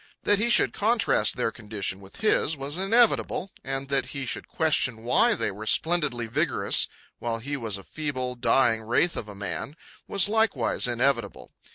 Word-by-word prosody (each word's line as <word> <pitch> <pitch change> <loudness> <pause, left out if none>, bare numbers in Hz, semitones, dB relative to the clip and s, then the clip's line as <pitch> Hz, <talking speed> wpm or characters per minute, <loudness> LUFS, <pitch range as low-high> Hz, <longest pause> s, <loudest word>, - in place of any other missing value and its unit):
That 205 -1 +3
he 235 +3 +1
should - - +4
contrast 210 - +2
their 120 -2 0
condition 105 -4 -5
with 95 - -13
his 160 -7 +2
was 140 +2 -3
inevitable; 200 -2 +2
and 135 0 -4
that 140 -1 0
he 140 -2 -5
should - - -4
question 130 -8 0
why 220 - +3
they - - -2
were 105 +3 -8
splendidly 150 -8 +1
vigorous 120 -4 +2 0.3
while 115 -1 -2
he 140 +6 -4
was 115 -7 -2
a 100 - -12
feeble, 130 -3 -4
dying 120 -2 +2
wraith 120 +10 +1
of 110 - -4
a 105 - -10
man, 100 +8 -5 0.3
was 195 -1 +3
likewise 205 - +1
inevitable. 125 +3 -1
135 Hz, 170 wpm, -26 LUFS, 115-170 Hz, 0.3 s, should